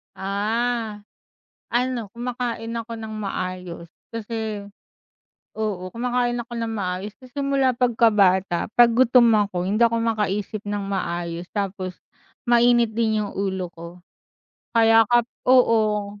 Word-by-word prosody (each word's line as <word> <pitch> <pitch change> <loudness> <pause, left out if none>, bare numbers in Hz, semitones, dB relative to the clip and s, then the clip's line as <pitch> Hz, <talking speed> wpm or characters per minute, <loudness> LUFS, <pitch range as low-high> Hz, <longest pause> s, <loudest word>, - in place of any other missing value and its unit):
Ah. 215 +2 -2 0.7
Ano 245 -1 0
kumakain 240 -1 -4
ako 230 0 -6
ng 220 -1 -7
maayos 185 -4 -5 0.2
kasi 220 -2 -4 1.0
oo, 200 -4 -3
kumakain 245 0 0
ako 240 0 -7
ng 230 -1 -2
maayos. 195 -1 -3
Kasi 255 -1 -15
simula 275 -2 +2
pagkata 210 -8 +2
pag 240 -1 +7
gutom 245 -1 +5 0.2
ako 180 -2 -3
hindi 210 +4 0
ako 230 0 +1
makaisip 210 -2 -1
ng 205 -1 -2
maayos 175 -2 -3
tapos 190 -3 -3 0.5
mainit 240 -1 +4
din 220 -2 +1
yung 200 - -8
ulo 190 -2 -2
ko. 170 0 -9 0.9
Kaya 225 0 +6
ka 240 0 +4 0.3
oo, 215 -5 +3
220 Hz, 120 wpm, -23 LUFS, 195-240 Hz, 1.0 s, pag